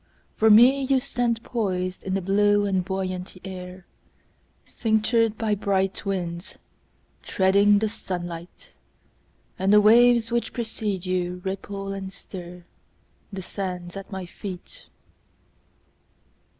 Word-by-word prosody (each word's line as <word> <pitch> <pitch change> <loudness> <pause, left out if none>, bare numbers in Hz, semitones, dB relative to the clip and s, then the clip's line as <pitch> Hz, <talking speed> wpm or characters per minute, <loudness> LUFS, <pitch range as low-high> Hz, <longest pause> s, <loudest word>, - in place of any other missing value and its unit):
For 220 - +4
me, 245 +6 +7
You 265 0 +2
stand 240 -2 -1
poisedIn 185 -4 -2
the 195 - -2
blue 205 +2 +3
and 190 -2 0
buoyant 185 -1 -4
air, 185 -1 -8 0.8
Cinctured 225 0 +1
by 220 -2 0
bright 195 -1 -1
winds, 180 0 -4 0.6
Treading 200 +2 +3
the 215 +2 +1
sunlight. 175 - -7 0.9
And 190 +1 +2
the 210 - +8
waves 235 +2 +5
which 235 0 -1
precede 220 -5 -3
youRipple 190 +2 -3
and 190 -1 -6
stirThe 180 +1 -12
sands 180 -2 -5
at 195 +1 -8
my 190 -2 -5
feet. 190 - -9
195 Hz, 105 wpm, -24 LUFS, 185-220 Hz, 0.9 s, the